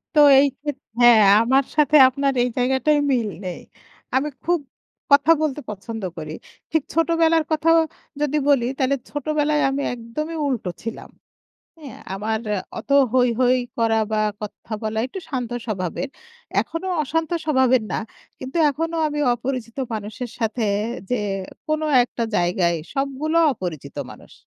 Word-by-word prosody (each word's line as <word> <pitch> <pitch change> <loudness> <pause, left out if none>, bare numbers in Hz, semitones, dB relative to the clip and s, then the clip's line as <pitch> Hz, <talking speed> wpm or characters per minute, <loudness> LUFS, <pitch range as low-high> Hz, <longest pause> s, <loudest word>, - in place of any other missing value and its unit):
তো 300 - +7 0.2
এই 285 - +5
খে 295 - -4 0.3
হ্যাঁ 240 -2 +8 0.2
আমার 265 +3 +3
সাথে 300 0 +3
আপনার 275 +1 0
এই 250 - 0
জায়গাটায় 265 +4 +2
মিল 235 -5 +1 0.2
নেই 180 - -5 0.5
আমি 270 +3 +2 0.2
খুব 345 -1 +2 0.5
কথা 285 +3 +6
বলতে 295 -2 -1
পছন্দ 215 +1 -6
করি। 155 -1 -6 0.4
ঠিক 320 -3 +1
ছোটবেলার 330 0 +3
কথাও 330 +2 +4 0.4
যদি 295 0 +1
বলি 265 -4 +4
তাহলে 275 0 +2
ছোটবেলায় 300 +1 0
আমি 275 +1 -2
একদমই 245 +8 -5
উল্টো 235 -9 -2
ছিলাম। 230 0 -6 0.7
হ্যাঁ? 280 -6 -10
আমার 215 +3 -2 0.4
অত - - -13 0.2
হৈ, 250 -1 +4
হৈ 255 0 +4 0.2
করা 225 -1 +2
বা 215 0 +1 0.2
কথা 210 +1 -7
বলা 220 0 -2
একটু 385 - -7
শান্ত 250 -4 -3
স্বভাবের 205 +5 -3 0.5
এখনো 330 +3 -5 0.2
অশান্ত 320 +3 -2
স্বভাবের 260 -5 +3
না। - - -1 0.4
কিন্তু 265 +6 -5
এখনো 325 +4 -3
আমি 295 0 -3
অপরিচিত 240 -1 -5 0.2
মানুষের 220 +3 -5
সাথে 225 0 -1 0.4
যে, 250 - 0 0.5
কোন 310 0 0 0.2
একটা 240 -1 -4
জায়গায় 175 0 +1 0.2
সবগুলো 280 +4 -1 0.2
অপরিচিত 155 - -6 0.2
মানুষ। - - -15
260 Hz, 140 wpm, -22 LUFS, 225-300 Hz, 0.7 s, হ্যাঁ